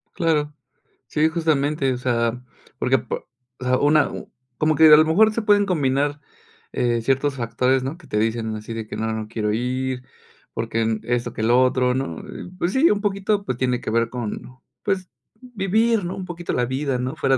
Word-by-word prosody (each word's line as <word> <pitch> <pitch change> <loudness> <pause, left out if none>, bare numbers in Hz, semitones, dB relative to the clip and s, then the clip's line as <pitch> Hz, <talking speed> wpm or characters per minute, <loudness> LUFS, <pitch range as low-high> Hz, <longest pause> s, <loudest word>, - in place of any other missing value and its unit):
Claro, 150 -3 +1 0.5
sí, 155 +1 +2
justamente, 150 -4 +1
o - - -4
sea, 120 -1 0 0.4
porque, - - +3
po - - -6 0.3
o - - -7
sea, 130 0 +3
una 150 +1 +3
uh - - -8 0.3
como 155 +2 +2
que 155 +1 +7
a 150 - +10
lo 155 - +5
mejor 215 +7 +4
se 230 - -1
pueden 205 -1 +4
combinar, 145 -4 0 0.5
eh, 120 -1 +1
ciertos 135 +3 +1
factores, 125 +2 +1
¿no? 140 +5 -4
Que 170 - -17
te 105 - -1
dicen 110 0 -1
así 110 +2 -7
de 110 -1 -5
que - - -6
no, 110 0 -1
no 110 -1 -4
quiero 105 -2 -1
ir, 125 +2 -2 0.5
porque, 115 0 -2
em, 110 -1 0
esto 120 -1 -1
que 110 - -4
lo 120 +3 +4
otro, 125 0 +2
¿no? 105 -12 -3
Eh, - - -9
pues 180 +1 -1
sí, 295 +6 +5
un 205 - +1
poquito, 200 0 0
pues, 125 - -2
tiene 125 -1 0
que - - -4
ver 115 +1 +1
con, 125 +1 -6 0.2
pues, 190 -3 -1 0.3
vivir, 225 -1 +1
¿no? 180 - -4
Un 185 - -5
poquito 175 -1 -5
la 125 - +1
vida, 130 +1 -1
¿no? 125 +1 -3
Fuera 135 -1 +2
130 Hz, 205 wpm, -22 LUFS, 120-165 Hz, 0.5 s, a